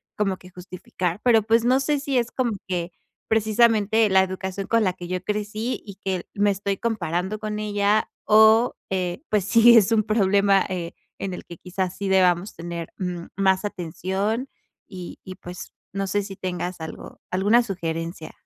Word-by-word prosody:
como 195 -3 0
que 180 - -15
justificar. 180 0 -5
Pero, 235 -3 +5
pues, 230 +2 +2
no 260 +2 +4
sé 295 +1 +1
si 275 -2 -1
es 235 -1 -2
como 250 -3 0 0.2
que 180 -1 -2 0.4
precisamente 220 0 +3
la 190 0 +5
educación 190 +1 -4
con 230 -1 +3
la 185 -3 +1
que 175 - -9
yo 185 0 -3
crecí, 210 +4 -3
y 200 -2 -9
que 190 -2 -2
me 205 0 +3
estoy 200 0 -2
comparando 190 -2 -2
con 215 -1 -4
ella, 205 0 +1 0.2
o, 220 +3 +6 0.2
eh, 185 - -2
pues 210 -3 +1
sí, 230 +2 +7
es 215 -1 +4
un 220 -2 +3
problema, 200 -2 +3
eh, 175 -3 -4 0.2
en 195 -1 -4
el - - -7
que, 170 - -10
quizás, 185 +1 -3
sí 200 - -3
debamos 185 0 +3
tener 170 0 -6 0.4
más, 190 0 +2
mm, 205 - 0
atención. 195 +6 -3 0.4
Y 180 -2 -8
y 185 - -8
pues 180 0 -9 0.2
no 195 0 -1
sé 205 +2 0
si 195 -1 -8
tengas 180 -1 -4
algo 160 - -9
alguna 205 +6 +4
sugerencia. 165 -5 -4
195 Hz, 175 wpm, -24 LUFS, 180-215 Hz, 0.4 s, sí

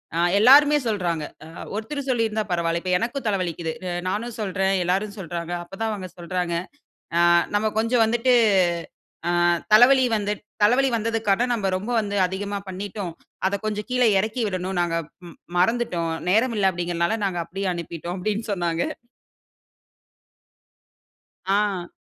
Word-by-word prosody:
அ - - 0 0.2
எல்லோருமே 290 +6 +7
சொல்லுறாங்க. 175 -7 -1 0.2
அ - - -11 0.3
ஒருத்தர் 275 +6 -4
சொல்லியிருந்தா 220 -3 +1
பரவாயில்ல. 170 -1 0
இப்போ 185 - -3
எனக்கும் 245 +3 -3
தலை 200 -2 +1
வலிக்குது. 170 -2 -3 0.2
அ - - -3 0.2
நானும் 225 +4 -3
சொல்றேன். 195 -1 0
எல்லோரும் 200 +4 -1
சொல்லுறாங்க. 170 -1 -5
அப்போ 175 +3 -11
தான் 225 - 0
அவங்க 190 -3 -5
சொல்லுறாங்க. 175 0 -3 0.6
அ - - +4 0.4
நம்ப 215 +1 +2
கொஞ்சம் 230 +1 +3
வந்துட்டு 235 +3 +2 1.0
ஆ - - +2 0.4
தலைவலி 255 +4 +7
வந்து 205 -1 -1 0.3
தலைவலி 255 +5 +4
வந்ததற்காக 225 0 +1
நம்ப 205 -4 -1
ரொம்ப 210 +6 -5
வந்து 205 -1 -4
அதிகமா 200 +2 -4
பண்ணிட்டோம். 190 -1 -5 0.4
அத 200 - 0
கொஞ்சம் 210 -1 -3
கீழ 250 0 +2 0.2
இறக்கி 215 +5 -2
விடணும். 185 -1 -3
நாங்க 170 -1 0 0.3
ம் - - -12 0.2
மறந்துட்டோம். 180 -4 +1 0.2
நேரம் 225 +4 +2
இல்ல 195 -2 +3
அப்டீங்குறதுல, 175 +4 -1
நாங்க 180 -3 -2
அப்படியே 195 +2 -4
அனுப்பிட்டோம் 170 +1 -6
அப்டீன்னு 215 +3 -2
சொன்னாங்க. 175 -3 -1 2.6
ஆ. 195 -3 +1
200 Hz, 140 wpm, -23 LUFS, 175-225 Hz, 2.6 s, எல்லோருமே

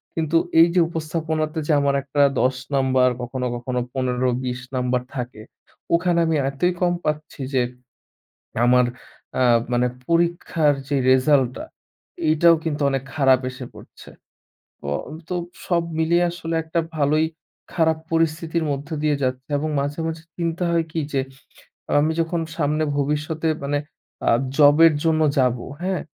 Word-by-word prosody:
কিন্তু 165 0 +1 0.2
এই 165 - +8
যে - - +5
উপস্থাপনাতে 160 -1 -2
যে 155 - +3
আমার 140 0 +2
একটা 140 +1 0 0.2
১০ 130 +1 +2 0.2
নাম্বার 130 -1 +3
কখনো, 125 +1 -4
কখনো 125 +1 -3
১৫-২০ 125 -1 -1 0.2
নাম্বার 125 0 0
থাকে 125 -4 -5 0.5
ওখানে 170 0 +1
আমি 160 -1 +1
এতই 175 +7 0
কম 175 -1 +3
পাচ্ছি 150 -1 -3
যে 130 - +3 1.0
আমার 125 +1 +5 0.6
আ - - +4 0.3
মানে 120 0 +2 0.2
পরীক্ষার 170 -3 +2
যে 145 - 0
রেজাল্টটা 130 -1 +3 0.6
এইটাও 165 +2 +5
কিন্তু 150 -2 -2
অনেক 135 -1 -1
খারাপ 135 -3 +4
এসে 130 0 -8
পড়ছে। - - -14 0.8
অও 75 - -1 0.3
তো 180 - -1 0.3
সব 170 -2 +2 0.2
মিলিয়ে 170 +2 +3
আসলে 165 -1 -4
একটা 160 +1 -1 0.2
ভালোই 155 +2 +2 0.5
খারাপ 160 -2 +2
পরিস্থিতির 165 0 0
মধ্য 140 +1 -4
দিয়ে 150 -1 +2
যাচ্ছে 130 +1 -2
এবং 155 +2 -2
মাঝে, 145 +3 -3
মাঝে 160 0 -5
চিন্তা 170 0 -2
হয় 165 -1 +1
কী 160 - -1
যে 135 - +2 0.8
আমি 155 +2 +2
যখন 165 +1 -1 0.2
সামনে 155 0 +1
ভবিষ্যতে 150 +3 -1 0.2
মানে 145 +1 0 0.5
আ - - +5 0.3
জবের 155 +2 +7
জন্য 160 -1 +2 0.2
যাব, 125 -1 +2 0.2
হ্যাঁ? 185 -1 -1
150 Hz, 140 wpm, -22 LUFS, 130-165 Hz, 1.0 s, এই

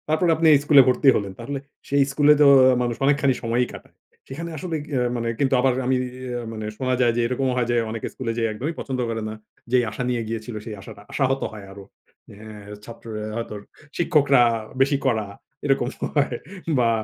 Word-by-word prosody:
তারপর 155 +3 +2
আপনি 160 +1 +2
এই 145 - +5
স্কুলে 145 -2 +7
ভর্তি 130 +3 +1
হলেন। 100 -2 -2
তাহলে 135 +4 -4 0.3
সেই 140 0 +4
স্কুলে 145 +2 +5
তো - - +7 0.4
মানুষ 120 -1 -1
অনেকখানি 140 -1 +3
সময়ই 120 +2 +1
কাটায়। - - -13 0.3
সেখানে 165 +6 -6
আসলে 165 +2 -4 0.2
আ - - +2 0.2
মানে 115 0 -3
কিন্তু 135 -1 +1
আবার 130 0 +3
আমি 130 +1 +2 0.2
ইয়ে 125 -1 -5
মানে 110 -1 -6
শোনা 130 -1 -1
যায় 120 -1 +4
যে - - +2
এরকমও 130 +1 -1
হয় 120 -2 +1
যে - - +1
অনেকে 110 0 -4
স্কুলে 120 -3 -3
যেয়ে 115 -1 +1
একদমই 140 +10 -4
পছন্দ 130 -2 -4
করে 115 -1 -3
না। - - -5 0.4
যেই 125 -1 +4
আশা 125 - -4
নিয়ে 120 -1 -1
গিয়েছিল 115 +1 -5
সেই 110 -3 -6
আশাটা 100 - -12
আশাহত 135 -1 0
হয় 105 -2 -9
আরো। 100 0 -11 0.5
অ্যা 105 0 -11
ছাত্ররা 115 -2 -8
হয়তো 115 -2 -5 0.4
শিক্ষকরা 145 -6 +4 0.4
বেশি 140 +1 +3
কড়া, 110 -5 +1 0.4
এরকম 135 -3 +1 0.3
হয় 140 -4 +1 0.4
বা 120 -1 +3
125 Hz, 190 wpm, -23 LUFS, 115-140 Hz, 0.5 s, স্কুলে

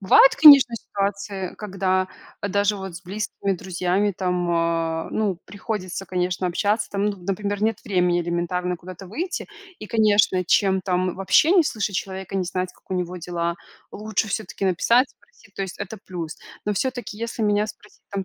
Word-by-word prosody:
Бывает, 195 +7 +7
конечно, 280 -6 +9
ситуации, 200 -2 -3
когда, 185 -2 0 0.3
а 200 - -2
даже 205 +1 +1
вот 190 -3 -7
с 185 - -11
близкими 200 +1 -3
друзьями 185 +3 0
там, 180 -2 0
а, 165 -1 0
ну, 200 -5 0
приходится, 195 -2 -5
конечно, 180 0 -1
общаться 205 +5 0
там, 200 0 -1
ну, 205 -1 -1
например, 200 +2 -2
нет 220 -1 +1
времени 180 -2 +2
элементарно 175 +1 -1
куда-то 185 +2 -10
выйти 340 - -4 0.3
и, - - -8
конечно, 205 -4 +3
чем 190 +1 +3
там 185 -1 0
вообще 195 - +4
не 360 -4 +6
слышать 215 -8 -2
человека, 190 0 -5
не 190 - +1
знать, 185 +1 -3
как - - -29
у - - 0
него 180 0 -2
дела, 170 0 -2 0.4
лучше 215 +1 -1
всё-таки 200 -1 -3
написать, 235 +8 +3
спросить, 205 -3 -24
то 195 - -3
есть 190 -1 -6
это 200 +2 -5
плюс. 170 -4 -6 0.3
Но 210 - +2
всё-таки, 245 0 -3
если 230 0 -4
меня 210 0 +2
спросить, 210 - -13
там 195 -1 -3
195 Hz, 170 wpm, -23 LUFS, 180-210 Hz, 0.4 s, конечно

